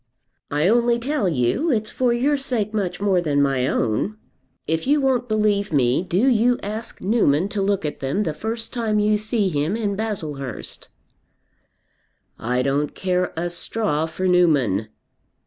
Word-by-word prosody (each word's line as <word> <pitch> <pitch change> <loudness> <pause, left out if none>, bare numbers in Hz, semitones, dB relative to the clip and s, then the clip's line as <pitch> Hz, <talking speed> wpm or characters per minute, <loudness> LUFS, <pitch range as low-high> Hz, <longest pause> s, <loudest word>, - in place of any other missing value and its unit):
"I 150 +4 +1
only 235 +2 +3
tell 245 -4 0
you; 155 - 0
it's 215 -3 0
for 250 -2 +1
your 260 +5 +2
sake 245 -6 -1
much 185 -4 -2
more 195 -3 +2
than 145 -4 0
my 135 -2 +2
own. 125 - -1 0.5
If 160 +8 -1
you 295 +2 +4
won't 260 -3 +1
believe 210 -2 +1
me, 130 -2 +2
do 185 +7 +1
you 245 0 +3
ask 215 +3 -5
Newman 190 -5 +2
to 205 -1 -2
look 195 -3 0
at 150 - -4
them 140 +10 -1
the 160 - -2
first 225 +8 -3
time 225 -3 0
you 210 0 +2
see 215 -2 0
him 155 +4 -1
in 210 -3 -1
Baslehurst." 155 - -4 1.5
"I 125 +2 0
don't 140 +2 -1
care 180 -1 0
a 170 +2 -1
straw 175 -2 -1
for 185 +3 -3
Newman." 145 - +3
195 Hz, 160 wpm, -22 LUFS, 150-225 Hz, 1.5 s, you